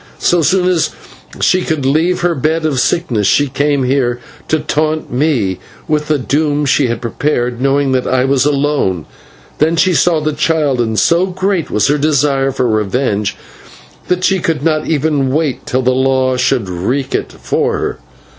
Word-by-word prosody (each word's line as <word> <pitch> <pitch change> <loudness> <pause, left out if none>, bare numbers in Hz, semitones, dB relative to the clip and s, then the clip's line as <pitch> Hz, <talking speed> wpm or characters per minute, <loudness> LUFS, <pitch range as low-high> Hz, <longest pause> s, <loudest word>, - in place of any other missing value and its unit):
So 175 -1 +2
soon 180 +3 +2
as 180 -3 +1 0.5
she 185 - +3
could 155 -6 -2
leave 160 +7 +1
her 175 0 +1
bed 155 +3 -1
of 145 -5 0
sickness 120 - 0
she 145 +6 +3
came 140 0 0
here 125 -2 0 0.3
to 155 - +1
taunt 155 -1 -2
me 125 - 0 0.3
with 150 -1 0
the 155 - +2
doom 145 +2 0
she 135 0 +2
had 120 +1 -3
prepared, 120 0 -1
knowing 140 0 +1
that 130 -1 0
I 130 0 +1
was 135 -1 +2
alone. 140 - 0 0.5
Then 160 +3 +2
she 185 +2 +2
saw 165 +2 +2
the 155 0 -2
child, 150 -4 +1
and 110 -2 -1
so 170 - +3
great 190 -2 -1
was 105 - +1
her 145 +1 +1
desire 140 -2 +1
for 125 -1 -1
revenge 105 -1 -1 0.7
that 180 0 0
she 190 0 +2
could 160 -4 -2
not 155 -1 0
even 145 -3 0
wait 150 -2 -1
till 130 +1 0
the 130 - +2
law 130 0 +1
should 125 -4 0
wreak 120 +10 -2
it - - -2
for - - -1
her. - - -3
145 Hz, 175 wpm, -14 LUFS, 130-155 Hz, 0.7 s, she